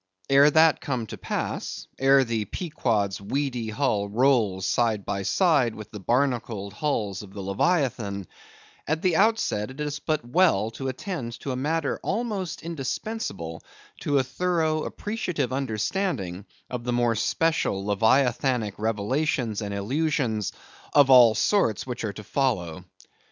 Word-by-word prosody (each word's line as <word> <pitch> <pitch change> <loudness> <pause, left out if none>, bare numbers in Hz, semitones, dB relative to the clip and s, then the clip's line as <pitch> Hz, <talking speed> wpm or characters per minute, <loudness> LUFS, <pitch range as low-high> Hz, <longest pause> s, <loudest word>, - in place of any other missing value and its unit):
Ere 140 +2 +7
that 160 +1 +4
come 125 -5 -2
to - - -7
pass; - - -4
ere 135 0 +5
the 115 -3 -2
Pequod's 110 - -1
weedy 125 0 -2
hull 105 -4 0
rolls 110 -5 +2
side 110 -1 +1
by 100 -1 -2
side 135 - +2
with 105 - -10
the 105 - -7
barnacled 120 -4 -1
hulls 105 -10 -2
of 100 -2 -12
the - - -6
leviathan; 100 - 0 0.6
at 155 +1 -1
the 180 -3 +3
outset 200 - +2
it 130 +2 -11
is 150 -1 -3
but 150 -5 -2
well 125 - +3
to 135 +3 -5
attend 130 - -5
to 135 - -4
a - - -2
matter 150 +3 -1
almost 200 -6 -3
indispensable 135 - -4 0.4
to 145 - +1
a 135 - +3
thorough 160 +2 0
appreciative 180 - -3
understanding 110 - -2 0.2
of 125 -2 -5
the 125 - -2
more 120 -1 +2
special 115 -4 0
leviathanic 115 +2 +2
revelations 115 +2 -1
and 100 -1 -4
allusions 115 0 -1 0.4
of 140 -2 +6
all 120 -4 +8
sorts 110 - +2
which 125 -2 -5
are 105 -2 -2
to 105 - -9
follow. 95 - -1
125 Hz, 140 wpm, -25 LUFS, 105-150 Hz, 0.6 s, all